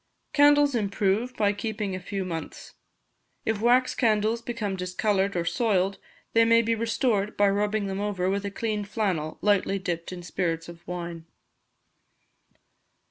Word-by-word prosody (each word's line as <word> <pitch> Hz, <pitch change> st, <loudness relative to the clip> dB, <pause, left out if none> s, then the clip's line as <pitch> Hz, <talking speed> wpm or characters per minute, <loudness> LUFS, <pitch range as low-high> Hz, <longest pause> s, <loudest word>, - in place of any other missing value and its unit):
Candles 290 Hz, -1 st, +5 dB
improve 210 Hz, +2 st, 0 dB
by 205 Hz, -1 st, +2 dB
keeping 210 Hz, -1 st, -3 dB
a -, -, -4 dB
few 190 Hz, +1 st, -4 dB
months. 165 Hz, -3 st, -6 dB, 0.7 s
If 220 Hz, -2 st, -1 dB
wax 250 Hz, +2 st, +4 dB
candles 220 Hz, -1 st, +1 dB
become 230 Hz, -4 st, -3 dB
discoloured 195 Hz, +1 st, 0 dB
or 170 Hz, -1 st, 0 dB
soiled, 195 Hz, -3 st, +1 dB, 0.3 s
they 230 Hz, -, +6 dB
may 230 Hz, 0 st, +5 dB
be 230 Hz, +1 st, +1 dB
restored 225 Hz, -2 st, 0 dB
by 205 Hz, -, +5 dB
rubbing 205 Hz, +1 st, 0 dB
them 195 Hz, 0 st, -3 dB
over 200 Hz, -3 st, -1 dB
with 200 Hz, +1 st, 0 dB
a 200 Hz, -, -2 dB
clean 210 Hz, 0 st, -2 dB
flannel 190 Hz, -7 st, -2 dB
slightly 200 Hz, -1 st, +2 dB
dipped 175 Hz, -3 st, -4 dB
in 180 Hz, -1 st, -7 dB
spirits 165 Hz, -2 st, -2 dB
of 170 Hz, 0 st, -12 dB
wine. 170 Hz, -2 st, -6 dB
205 Hz, 145 wpm, -26 LUFS, 185-225 Hz, 0.7 s, they